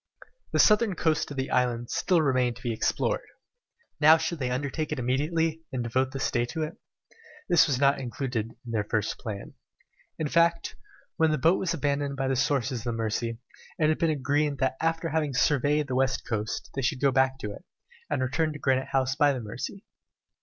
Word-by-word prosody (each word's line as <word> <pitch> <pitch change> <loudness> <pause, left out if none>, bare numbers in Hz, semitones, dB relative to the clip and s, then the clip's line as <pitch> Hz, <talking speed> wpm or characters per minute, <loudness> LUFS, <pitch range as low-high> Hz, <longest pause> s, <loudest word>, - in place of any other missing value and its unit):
The - - 0
southern 210 -2 +4
coast 160 -2 0
of 145 - -8
the 130 0 -2
island 120 -2 0
still 175 -4 +2
remained 130 -4 +1
to 125 - -14
be 120 -2 -1
explored. - - 0 0.8
Now 155 +1 +7
should 160 0 -3
they 125 -2 -1
undertake 140 +4 -2
it - - -1
immediately, 155 +6 0
and 130 -2 -2
devote 130 +3 0
this 135 0 -2
day 120 -3 +1
to 160 +6 -3
it? 155 +2 -6 0.7
This 175 - +5
was 135 -4 0
not 140 0 +3
included 120 -2 -3
in 120 - -6
their 110 -2 0
first 105 0 -2
plan. 105 -3 -6 0.6
In 155 - -1
fact, 170 +2 +2 0.4
when 160 -2 +4
the 155 - +1
boat 165 +5 +3
was 170 -2 -1
abandoned 140 -2 -1
at 135 0 0
the 135 - +1
sources 130 -2 0
of 115 - -11
the 120 - -1
Mercy, 115 +1 -2 0.4
it 155 -1 +3
had 155 - +1
been 165 - +2
agreed 145 0 0
that 130 0 0
after 165 0 0
having 150 -4 -1
surveyed 145 +3 +2
the 130 - -3
west 130 +1 0
coast, 110 -1 -3
they 135 - -2
should 130 +1 0
go 140 0 +3
back 130 0 +2
to 105 -5 -5
it, - - -10 0.5
and 140 -3 0
return 155 +4 0
to - - -7
Granite 130 -2 +1
House 135 0 0
by 145 0 +4
the 130 - -3
Mercy. 120 - -6
135 Hz, 205 wpm, -27 LUFS, 125-155 Hz, 0.8 s, Now